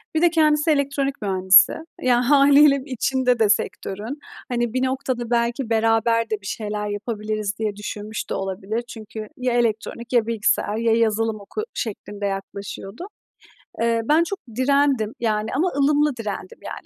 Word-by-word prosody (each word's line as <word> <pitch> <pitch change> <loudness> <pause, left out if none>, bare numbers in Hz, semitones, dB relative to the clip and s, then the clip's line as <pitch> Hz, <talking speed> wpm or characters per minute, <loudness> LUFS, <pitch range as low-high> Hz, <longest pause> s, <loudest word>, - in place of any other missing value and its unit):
bir 315 - +2
de 345 - +6
kendisi 310 -1 +3
elektronik 280 -2 -1
mühendisi. 190 -2 +5 0.3
Ya, 245 0 +2
hâliyle 280 0 +6
içinde 255 -2 0
de 215 -2 +3
sektörün. 210 +6 -2 0.3
Hani, 240 -1 -1
bir 255 0 0
noktada 260 -2 -2
belki 235 +1 0
beraber 225 0 +2
de 215 -2 -2
bir - - -15
şeyler 210 -1 -3
yapabiliriz 210 -1 -3
diye 210 -2 -2
düşünmüş 210 +1 -6
de - - -2
olabilir. 195 +4 -3
Çünkü, 215 -1 -8
"Ya 250 -1 -1
elektronik 235 +1 -1
ya 230 -2 +3
bilgisayar 215 -1 +1
ya 230 -1 +2
yazılım 225 -1 +1
oku." 315 - -5
şeklinde 205 -2 -5
yaklaşıyordu. 200 - -6 0.7
Eee, 230 0 +2
ben 315 +5 +4
çok 395 +3 -5 0.2
direndim 265 -4 +2
yani 215 -1 0
ama 350 +6 +2
ılımlı 295 0 +3
direndim, 225 - -6
yani. - - -7
230 Hz, 150 wpm, -22 LUFS, 210-270 Hz, 0.7 s, de